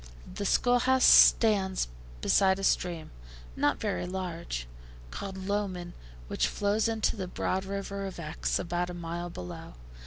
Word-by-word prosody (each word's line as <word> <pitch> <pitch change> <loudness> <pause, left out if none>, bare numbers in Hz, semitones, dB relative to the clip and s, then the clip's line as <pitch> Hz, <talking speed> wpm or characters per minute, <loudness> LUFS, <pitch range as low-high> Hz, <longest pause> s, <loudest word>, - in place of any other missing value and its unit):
The 200 - -3
school 245 +4 +3
house 260 +1 +2
stands 195 -4 +5 0.3
beside 190 - +3
a 195 - -6
stream, 175 -4 0 0.4
not 145 - +1
very 205 -4 -2
large, 170 - -4 0.5
called 190 - -6
Lowman, 190 -3 -3 0.3
which - - 0
flows 205 +2 0
into 225 -1 0
the 190 -4 -4
broad 185 +1 -2
river 195 0 -4
of 190 - -8
Exe, 155 0 -2
about 175 +1 -2
a 180 - -6
mile 170 0 -5
below. 90 - -8
190 Hz, 145 wpm, -29 LUFS, 175-200 Hz, 0.5 s, stands